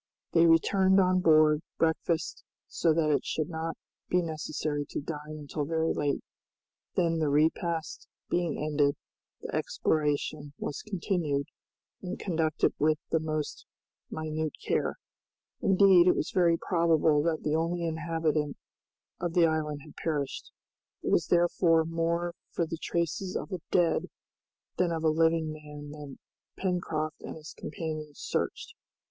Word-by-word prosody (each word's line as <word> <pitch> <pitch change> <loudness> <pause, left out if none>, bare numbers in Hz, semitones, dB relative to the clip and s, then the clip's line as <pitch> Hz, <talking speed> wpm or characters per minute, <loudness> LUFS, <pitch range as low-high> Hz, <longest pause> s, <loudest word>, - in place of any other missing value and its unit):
They 170 0 +5
returned 190 +4 +4
on 185 -1 +4
board, 155 -3 +5 0.2
breakfasted, 165 0 0 0.2
so 165 - +1
that 155 -1 +2
it 145 - +2
should 155 +1 -2
not 160 0 -3 0.3
be 180 0 +3
necessary 155 -2 -2
to - - -3
dine 150 0 -6
until 150 0 -4
very 160 +2 0
late; 145 -1 -1 0.7
then 165 -2 +2
the 155 -2 +1
repast 160 +2 0 0.2
being 175 -3 0
ended, 145 -1 +1 0.5
the - - -6
exploration 150 -1 0
was 145 - -4
continued 170 -8 -1 0.6
and 185 0 -5
conducted 160 -4 +1
with 155 +1 +3
the 165 - +3
most 155 -1 -3 0.4
minute 155 -1 -3
care. - - 0 0.7
Indeed, 190 -2 +6
it 180 - +5
was - - -2
very 170 -3 +4
probable 165 -4 +3
that 160 0 0
the 150 - 0
only 170 +1 0
inhabitant 160 -2 -1 0.6
of 175 -1 -3
the 175 -2 +6
island 155 -2 -1
had 150 - -14
perished. 145 -4 -2 0.5
It - - -1
was - - +3
therefore 170 -1 +3
more 170 +1 -1 0.2
for 170 - -1
the 165 0 -5
traces 170 +2 -2
of - - -4
a 185 -3 -4
dead 175 -2 +2 0.7
than 180 -2 +2
of 165 -1 -2
a 160 - +4
living 160 0 +2
man 150 -1 -9
that 145 -2 -9 0.4
Pencroft 165 -5 -2
and - - -7
his 155 -1 -10
companions 155 -1 -6
searched. - - -3
160 Hz, 140 wpm, -29 LUFS, 150-170 Hz, 0.7 s, Indeed